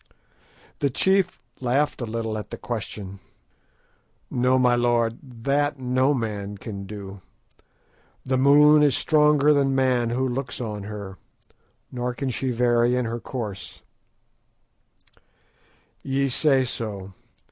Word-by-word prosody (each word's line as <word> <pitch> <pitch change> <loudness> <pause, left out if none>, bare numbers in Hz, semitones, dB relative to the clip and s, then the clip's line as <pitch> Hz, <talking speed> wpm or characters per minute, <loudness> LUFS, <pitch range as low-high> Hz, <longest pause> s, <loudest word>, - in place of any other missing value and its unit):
The 140 - +1
chief 190 +7 +1 0.2
laughed 135 +3 0
a 120 - -3
little 110 0 -3
at 105 - -6
the - - -6
question. 105 -4 -6 1.1
"No, 125 +1 +2
my 125 -1 +4
lord, 120 -1 +1 0.2
that 145 +2 +1
no 130 +2 +1
man 105 -4 -4
can 100 -1 -7
do. 100 -1 -8 1.0
The 130 0 0
moon 150 +2 +6
is 145 -4 +4
stronger 150 -1 +4
than 135 -2 +2
man 130 -3 +2
who 130 +3 0
looks 130 +1 -4
on 105 -4 -5
her, 100 -3 -8 0.7
nor 125 -1 -3
can 130 +2 -2
she 130 +2 -2
vary 120 0 +2
in 125 -1 0
her 115 +1 -3
courses." 110 -7 -6 2.2
"Ye 135 0 0
say 135 0 +3
so. 100 -5 -5
125 Hz, 125 wpm, -24 LUFS, 110-135 Hz, 2.2 s, moon